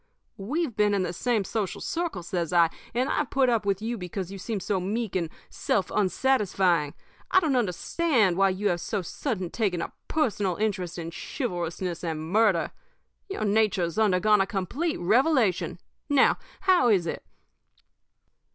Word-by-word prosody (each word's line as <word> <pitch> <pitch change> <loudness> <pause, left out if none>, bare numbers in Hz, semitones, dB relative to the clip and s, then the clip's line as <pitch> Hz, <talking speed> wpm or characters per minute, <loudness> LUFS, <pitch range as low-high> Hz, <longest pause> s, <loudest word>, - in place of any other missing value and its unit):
We've 260 - -2
been 210 -1 +3
in 195 - +1
the 175 - -3
same 230 +2 0
social 205 -1 -3
circle,' 330 - -3
says 170 -2 -2
I, 170 -2 +4 0.2
'and 255 +2 +1
I've 295 - 0
put 270 -2 +3
up 225 -4 +1
with 200 +1 0
you 230 0 -3
because 180 +1 -5
you 195 - -7
seemed 205 0 -4
so 200 -3 0
meek 210 +3 -3
and 170 -3 0 0.2
self 190 -3 -1
un 200 -3 +2
satisfying. 185 - +1 0.3
I 375 - +6
don't 310 -7 0
understand 230 - +1
why 195 +1 +4
you 195 +2 0
have 175 -2 -1
so 205 -1 -2
sudden 190 - -3
taken 200 -6 0
a - - -4
personal 205 - 0
interest 185 -5 -2
in 165 -1 -5
chivalrousness 175 - -4
and 160 -1 -4
murder. 205 -5 +3 0.6
Your 390 - -2
nature's 200 -4 +1
undergone 210 0 +4
a 195 - +1
complete 245 - -2
revelation. 225 - +2 0.3
Now, 280 -2 +4 0.2
how 365 -10 +4
is 190 -6 +3
it?' 165 - -4
200 Hz, 160 wpm, -26 LUFS, 180-240 Hz, 0.6 s, I